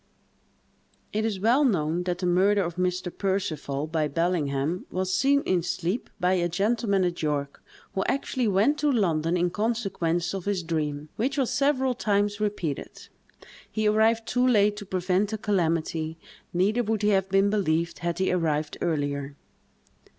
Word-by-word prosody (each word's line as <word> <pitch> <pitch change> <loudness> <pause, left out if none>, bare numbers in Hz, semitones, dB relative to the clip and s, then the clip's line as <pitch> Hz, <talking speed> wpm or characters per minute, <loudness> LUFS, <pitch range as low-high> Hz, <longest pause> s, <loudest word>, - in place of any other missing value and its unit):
It 215 +1 0
is 210 -4 -2
well 235 +8 +3
known 175 - +1
that 180 -1 -1
the 180 - -3
murder 195 +3 +3
of 170 -1 -4
Mr. 180 0 -1
Percival, 165 -8 -2
by 155 -1 0
Bellingham, 155 0 -1
was 185 0 -2
seen 280 +9 +3
in 185 -2 +1
sleep 180 +5 -2
by 180 +1 +2
a 175 -2 +1
gentleman 200 +2 +1
at 175 -1 -1
York, 145 -2 -2 0.3
who 190 - 0
actually 260 -3 0
went 210 +10 +2
to 295 -1 +2
London 170 - +1
in 175 0 +1
consequence 195 -6 -1
of 195 -2 -5
his 200 -3 -1
dream, 150 -2 -3
which 270 +6 -1
was 265 -4 +1
several 265 -2 +2
times 205 -3 0
repeated. 200 -9 -4 0.6
He 215 -1 0
arrived 225 +2 +3
too 250 +1 +2
late 210 -4 +4
to 205 -2 -8
prevent 185 +2 0
the 220 - -3
calamity; 165 -5 -1 0.3
neither 200 +7 +2
would 220 -2 -1
he 210 - +4
have 195 -2 +2
been 195 +1 +3
believed, 170 -5 0
had 170 -1 -2
he 190 +1 +1
arrived 155 -4 -1
earlier. 145 -3 -2
185 Hz, 160 wpm, -26 LUFS, 165-210 Hz, 0.6 s, late